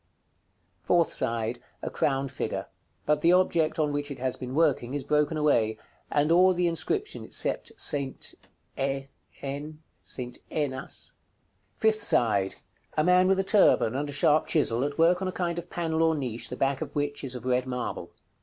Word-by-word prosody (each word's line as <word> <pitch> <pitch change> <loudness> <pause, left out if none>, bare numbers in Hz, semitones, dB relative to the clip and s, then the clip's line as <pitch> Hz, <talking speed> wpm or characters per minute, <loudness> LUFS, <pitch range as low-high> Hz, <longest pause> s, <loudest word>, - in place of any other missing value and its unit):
Fourth 170 -2 +2
side. 115 +1 -2 0.2
A - - -3
crowned 135 -1 0
figure; 135 - -3 0.4
but 150 0 +2
the 170 - +5
object 170 -3 +2
on 150 -2 +1
which 145 0 -2
it 140 - -6
has 130 0 -1
been 130 +1 -6
working 145 -5 +2
is 145 - -2
broken 150 +2 +1
away, 115 -8 +2 0.3
and 150 +2 +2
all 185 +2 +5
the 180 0 +1
inscription 280 - -1
except - - -1
"ST. 140 - 0 0.5
E(N?)AS." 135 0 -5 0.6
Fifth 220 0 +2
side. 100 - +2 0.4
A 155 - +4
man 180 +2 +5
with 190 0 +3
a - - +2
turban, 190 - +4
and 145 +2 -2
a - - -5
sharp 155 +1 +3
chisel, 130 -6 +2
at 145 0 -3
work 170 +3 +4
on 190 - -1
a - - -1
kind 175 -2 -2
of 175 +1 -10
panel 160 -2 -1
or 160 0 +3
niche, 125 -5 -3
the 125 - -6
back 135 0 0
of - - -5
which 145 0 -2
is 130 -2 -3
of 125 -1 -7
red 125 0 +1
marble. 125 -1 -4
145 Hz, 170 wpm, -27 LUFS, 130-165 Hz, 0.6 s, the